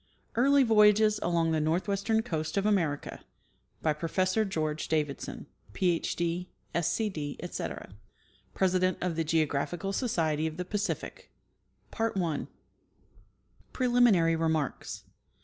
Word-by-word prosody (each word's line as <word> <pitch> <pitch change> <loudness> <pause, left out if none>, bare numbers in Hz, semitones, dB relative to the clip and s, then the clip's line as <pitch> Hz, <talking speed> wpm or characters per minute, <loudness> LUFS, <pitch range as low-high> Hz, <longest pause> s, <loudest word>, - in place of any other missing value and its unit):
EARLY 275 +4 +5
VOYAGES 215 -2 +5
ON 170 -1 +1
THE 160 -1 +1
NORTHWESTERN 200 +7 0
COAST 160 -5 -3
OF 200 - +1
AMERICA 170 -9 0 0.6
• 150 -1 +1
PROFESSOR 185 +6 +1
GEORGE 155 -5 -2
DAVIDSON, 150 -3 -2 0.3
PH. 175 - 0
D., 175 +1 -2 0.2
SC. 170 -1 +1 0.2
D., 145 -3 -4
ETC. 175 - -6 0.6
{President 185 -1 +2
of 180 -2 -2
the 165 - 0
Geographical 160 +4 0
Society 160 - 0
of 160 0 -6
the 180 - -3
Pacific) 205 +2 -4 2.5
Preliminary 240 -10 +4
Remarks. 160 -3 -2
175 Hz, 105 wpm, -29 LUFS, 160-205 Hz, 2.5 s, EARLY